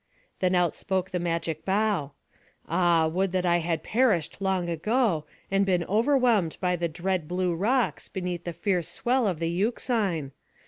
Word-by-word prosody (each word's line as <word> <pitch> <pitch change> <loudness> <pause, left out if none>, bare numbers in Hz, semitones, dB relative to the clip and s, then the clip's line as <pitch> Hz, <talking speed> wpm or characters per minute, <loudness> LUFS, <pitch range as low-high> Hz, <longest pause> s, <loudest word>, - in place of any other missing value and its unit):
Then 185 0 +2
out 175 -2 +2
spoke 190 -1 -2
the 180 - -1
magic 165 -2 -2
bough: 195 -7 0 0.5
"Ah, 170 -3 +3
would 185 +4 0
that 185 -1 0
I 175 0 +3
had 165 -1 -2
perished 215 - +1
long 190 -2 0
ago, 170 - 0 0.2
and 195 0 +3
been 180 -3 +1
whelmed 225 - +2
by 180 -1 +1
the 170 0 -1
dread 175 0 -2
blue 180 0 0
rocks, 230 +8 0
beneath 180 -2 -4
the 175 - -4
fierce 180 -2 -1
swell 250 -1 +1
of 180 -4 -1
the 165 +1 -1
Euxine! 195 - -1
180 Hz, 165 wpm, -27 LUFS, 170-205 Hz, 0.5 s, Ah